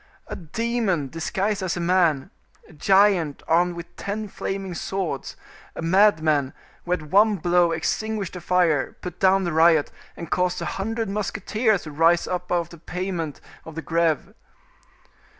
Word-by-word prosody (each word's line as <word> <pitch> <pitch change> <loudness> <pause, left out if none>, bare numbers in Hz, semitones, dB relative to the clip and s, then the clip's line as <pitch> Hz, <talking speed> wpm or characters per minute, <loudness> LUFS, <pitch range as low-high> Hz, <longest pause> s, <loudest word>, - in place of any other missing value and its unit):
"A - - -6
demon 195 - -1
disguised 190 +6 -2
as 185 -2 -2
a - - -2
man, 170 -5 +2 0.4
a - - -17
giant 190 -2 +3
armed 175 +2 +2
with 170 0 -9
ten 210 +2 -4
flaming 195 -1 -4
swords—a 175 -5 -6
madman, 160 -7 +3 0.3
who 175 - 0
at 175 -3 -2
one 205 +7 +4
blow 175 -1 +2
extinguished 200 +5 -2
the 180 - -7
fire, 170 -6 +1
put 180 -1 -7
down 190 0 +4
the 175 -3 -2
riot, 160 -1 +4 0.3
and 170 - -8
caused 180 0 +1
a - - -4
hundred 225 +3 -3
musketeers 210 +1 0
to 155 - -8
rise 165 +3 +3
up 180 0 -4
out 175 -1 +3
of 170 - -10
the 170 - -12
pavement 175 -3 -4 0.2
of 160 - -11
the 160 - -5
Greve." 165 -2 0
175 Hz, 155 wpm, -24 LUFS, 165-195 Hz, 0.4 s, one